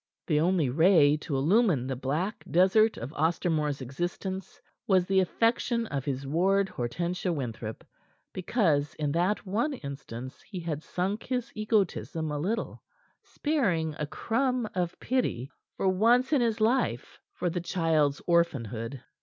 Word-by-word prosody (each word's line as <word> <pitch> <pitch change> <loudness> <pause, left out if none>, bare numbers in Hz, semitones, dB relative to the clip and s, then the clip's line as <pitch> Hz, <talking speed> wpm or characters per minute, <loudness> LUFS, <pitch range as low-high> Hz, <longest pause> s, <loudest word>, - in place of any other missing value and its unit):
The 150 -3 +2
only 170 -2 +2
ray 155 +1 +5
to 150 -1 -4
illumine 170 - +3
the 130 0 -2
black 150 - -2
desert 195 +5 +4
of 125 +6 -6
Ostermore's 155 -3 0
existence 175 +8 -4 0.3
was 185 -3 +4
the 190 +1 +3
affection 230 +5 +1
of 140 - -4
his 135 -1 -3
ward, 190 +7 +2
Hortensia 170 +9 -2
Winthrop, 115 -7 -5 0.5
because 165 - +1
in 150 -2 -1
that 180 +7 0
one 225 +10 0
instance 135 - -8
he 195 -3 -8
had 160 -3 -3
sunk 190 +6 -2
his 250 -2 -3
egotism 200 -7 -1
a 150 - -2
little, 215 +9 -2 0.4
sparing 185 - 0
a 150 - -2
crumb 250 - 0
of 180 -2 -2
pity 165 - -1 0.3
for - - 0
once 235 +9 +3
in 280 - +4
his 230 -1 +1
life 230 +5 0
for 180 - -2
the 175 +1 -2
child's 160 -5 +1
orphanhood. 130 - 0
175 Hz, 140 wpm, -28 LUFS, 145-210 Hz, 0.5 s, ray